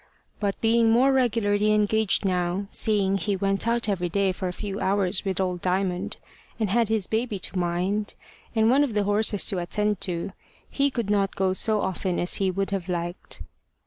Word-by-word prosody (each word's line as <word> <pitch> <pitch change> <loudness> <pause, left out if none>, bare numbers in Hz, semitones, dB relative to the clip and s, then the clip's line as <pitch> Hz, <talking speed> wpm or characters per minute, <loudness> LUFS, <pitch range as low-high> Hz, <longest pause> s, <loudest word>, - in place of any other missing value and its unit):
But 200 -2 -2
being 230 0 +3
more 250 +4 +4
regularly 215 -5 +2
engaged 215 0 +2
now, 180 +1 0
seeing 195 -3 +2
he 200 +3 -1
went 195 +3 0
out 235 0 +1
every 180 -4 -1
day 195 +2 +1
for 185 0 -4
a - - -2
few 200 +2 -5
hours 190 -1 +1
with 190 -2 -2
old 180 -2 -1
Diamond, 185 -1 -1 0.4
and 215 -4 0
had 230 0 +2
his 220 -4 +1
baby 220 0 -2
to 190 0 -3
mind, 180 +4 -1 0.4
and 220 0 +3
one 280 +3 +4
of 250 -7 -2
the 210 - +2
horses 205 0 +2
to 190 - 0
attend 210 +3 -1
to, 175 0 -2 0.4
he 280 0 +1
could 235 -6 -3
not 200 -2 +1
go 190 -1 +1
so 215 +2 +2
often 185 -1 -2
as 175 - +2
he 195 -1 +1
would 195 +2 -2
have 190 -2 -3
liked. 175 0 -4
200 Hz, 190 wpm, -25 LUFS, 185-215 Hz, 0.4 s, more